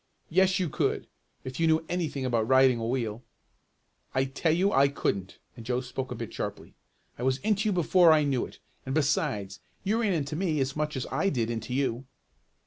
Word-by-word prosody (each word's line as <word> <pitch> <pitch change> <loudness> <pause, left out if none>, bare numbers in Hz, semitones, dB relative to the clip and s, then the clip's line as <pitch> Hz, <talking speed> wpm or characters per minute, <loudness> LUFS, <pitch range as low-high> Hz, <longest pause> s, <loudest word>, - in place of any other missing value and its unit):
"Yes 190 +2 +4
you 180 - 0
could, - - -1 0.4
if 130 +2 -6
you 165 - +3
knew 160 0 +2
anything 155 -7 -2
about 115 -3 +1
riding 130 -1 +5
a 115 - -2
wheel." 115 -3 -2 0.9
"I 130 0 +3
tell 140 +5 0
you 185 +5 +2
I 135 +1 +5
couldn't," 100 -8 -2 0.2
and 115 - -10
Joe 125 +2 0
spoke 130 +1 -5
a - - -3
bit - - -6
sharply. - - -5 0.5
"I - - -5
was 130 +1 +1
into 215 0 +1
you - - +1
before 175 -1 +5
I 155 -1 +5
knew 135 -4 +1
it. - - -16 0.3
And 130 +1 -3
besides, 135 -10 0 0.2
you 215 +4 +1
ran 210 -4 +2
into 150 -2 -2
me 160 -3 0
as 135 0 -1
much 150 -1 -2
as 130 - -3
I 160 +9 +1
did 120 -6 -1
into 115 +2 -4
you." 130 -2 -1
135 Hz, 205 wpm, -28 LUFS, 125-165 Hz, 0.9 s, riding